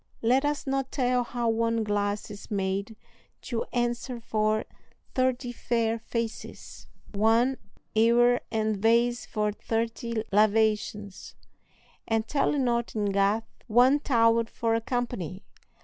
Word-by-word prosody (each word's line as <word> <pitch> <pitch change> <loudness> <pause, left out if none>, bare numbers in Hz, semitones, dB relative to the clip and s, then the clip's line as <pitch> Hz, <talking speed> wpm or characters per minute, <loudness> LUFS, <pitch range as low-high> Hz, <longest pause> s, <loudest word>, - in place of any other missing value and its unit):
Let 255 +4 +3
us 295 -1 -1
not 270 -1 -1
tell 250 -2 +1
how 240 0 -3
one 230 0 +1
glass 205 0 -1
is 205 -1 -10
made 200 +1 -2 0.5
to 235 -3 -3
answer 240 +1 -2
for 215 -1 0 0.5
thirty 255 -1 0
fair 230 -1 -1
faces, 230 0 -6 0.2
one 225 +5 +2 0.3
ewer 240 +2 +4
and 220 -1 0
vase 235 +3 +2
for 210 -1 -1
thirty 230 +1 -2
lavations; 210 -1 +1 0.7
and 225 0 0
tell 295 0 +1
it - - 0
not 235 -2 0
in 205 -2 0
Gath 200 +3 +2 0.2
one 250 +5 +5
towel 230 -4 +3
for 225 0 -2
a 225 - +1
company! 225 - -3
230 Hz, 125 wpm, -27 LUFS, 215-245 Hz, 0.7 s, one